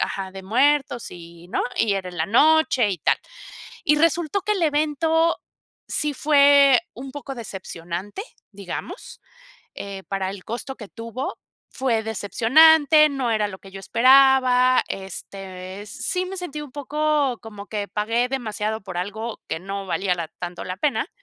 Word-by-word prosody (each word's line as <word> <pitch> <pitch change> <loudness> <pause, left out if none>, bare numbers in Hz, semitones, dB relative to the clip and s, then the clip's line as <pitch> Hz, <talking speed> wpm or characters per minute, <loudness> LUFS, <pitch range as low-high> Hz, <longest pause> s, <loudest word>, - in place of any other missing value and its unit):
ajá, 190 -1 -3
de 190 0 -9
muertos, 260 +3 +1
y, 170 0 -12
¿no? - - -1
Y 205 -3 +2
era 190 -2 -3
en 175 - -11
la 160 - 0
noche 265 -2 +4
y 180 - -3
tal. - - +2 0.7
Y 300 - +4
resultó 335 +4 +1
que 425 - 0
el 380 -4 -2
evento 315 +2 +2 0.5
sí 300 -1 0
fue 280 -1 +5
un 260 +2 -8
poco 280 -2 -7
decepcionante, 190 - -6 0.3
digamos, 200 - -8 0.5
eh, 195 -1 -7
para 195 -1 -2
el 195 -1 -9
costo 245 +4 -6
que 210 -5 -10
tuvo, 230 +3 -6 0.3
fue 240 -4 0
decepcionante, 300 +9 +5
no 265 -4 -2
era 210 -1 +1
lo 190 -1 -9
que 195 - -14
yo 195 - -8
esperaba, 255 +2 +5
este, 190 0 -7
sí 365 - -2
me 385 +1 -6
sentí 330 -5 -5
un 290 - -10
poco 290 -2 0
como 210 -2 -10
que 205 -2 -4
pagué 225 +5 0
demasiado 220 -4 -3
por 185 -2 -6
algo 220 +5 -5
que 160 - -2
no 195 +1 -5
valía 190 0 0
la 170 -2 -5
tanto 175 0 -6
la 185 0 -5
pena, 290 +6 0
230 Hz, 160 wpm, -23 LUFS, 195-290 Hz, 0.7 s, fue